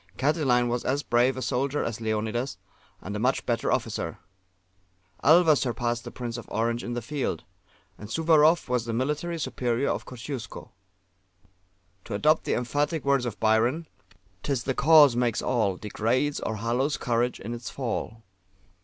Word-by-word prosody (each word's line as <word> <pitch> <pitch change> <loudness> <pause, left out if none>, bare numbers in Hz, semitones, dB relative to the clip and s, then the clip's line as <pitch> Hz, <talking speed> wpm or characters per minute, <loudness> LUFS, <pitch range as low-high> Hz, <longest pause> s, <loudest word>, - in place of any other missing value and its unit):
Catiline 130 -4 +2
was 120 0 -1
as 140 +3 0
brave 120 +3 +2
a 130 - -3
soldier 135 +4 -1
as 115 -1 -4
Leonidas, 110 +4 -2 0.5
and 100 +2 -5
a - - -2
much 125 +4 0
better 115 -2 0
officer. - - -2 1.1
Alva 160 +1 +6
surpassed 120 -2 -2
the - - -5
Prince 120 -1 -5
of 115 - -12
Orange 115 +2 -1
in 120 - -4
the 120 - -4
field; 135 - -3 0.6
and 105 - -9
Suwarrow 160 +3 +4
was 125 -2 0
the 115 - -3
military 150 +8 -1
superior 125 -3 -1
of - - -4
Kosciusko. 125 -2 -7 1.3
To - - -4
adopt 155 +8 +2
the - - 0
emphatic 145 +5 -1
words 140 -3 +2
of 110 -3 -6
Byron: 115 +9 +2 0.6
"'Tis 135 -1 -1
the 130 - -1
Cause 145 -2 +6
makes 120 -2 +1
all, 110 -7 +1
Degrades 120 +8 -1
or 110 - -3
hallows 120 +7 0
courage 120 0 0
in 115 +4 -6
its 120 0 -6
fall." 115 -3 -4
125 Hz, 155 wpm, -26 LUFS, 115-140 Hz, 1.3 s, Alva